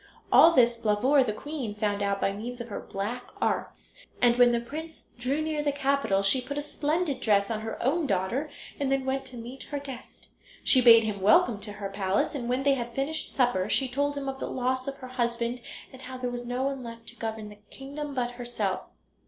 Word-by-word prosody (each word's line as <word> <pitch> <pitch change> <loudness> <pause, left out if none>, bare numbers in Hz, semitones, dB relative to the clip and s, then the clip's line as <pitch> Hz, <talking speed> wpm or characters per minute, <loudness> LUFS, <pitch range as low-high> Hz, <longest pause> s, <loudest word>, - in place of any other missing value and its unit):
All 330 - +8
this 240 -4 +4
Blauvor, 230 +6 +3
the 230 - -1
queen, 255 -2 -5
found 205 -1 -1
out 200 0 0
by 195 - +1
means 235 +5 -6
of 235 0 -6
her 205 - -4
black 220 +6 -5
arts, - - -2 0.3
and 240 -1 +5
when 245 0 +6
the 235 - +2
prince 310 +7 -8
drew 275 +5 0
near 310 -1 -1
the 295 -1 +1
capital 275 -8 +1
she 200 +6 +4
put 285 +3 -5
a - - 0
splendid 295 0 -1
dress 200 -1 +2
on 215 -1 -2
her 220 0 -5
own 295 +4 +1
daughter 215 +9 0 0.3
and 275 -1 0
then 270 -1 +1
went 265 0 -1
to 255 -2 -9
meet 240 +3 -8
her 290 - -2
guest. 275 -3 -9 0.3
She 260 - +5
bade 230 -2 +8
him 210 -3 -3
welcome 215 +2 +5
to 205 0 -6
her 205 -1 -5
palace, 195 0 0
and 245 -5 -4
when 255 +2 0
they 280 0 +4
had 240 -3 -4
finished 285 +4 -2
supper 240 -7 +2
she 270 - +2
told 285 +3 -1
him 275 -1 -4
of 270 0 -4
the - - -3
loss 255 +1 -1
of 275 - -3
her 255 - -9
husband, 240 -1 -1 0.3
and 260 - -12
how 260 0 -7
there 250 -1 -3
was 245 0 -5
no 250 +2 -1
one 275 -1 -2
left 230 -1 -9
to 240 - -13
govern 220 -2 -5
the 210 0 -14
kingdom 285 +1 -7
but 245 -1 0
herself. 240 -6 -2
245 Hz, 225 wpm, -28 LUFS, 225-275 Hz, 0.3 s, All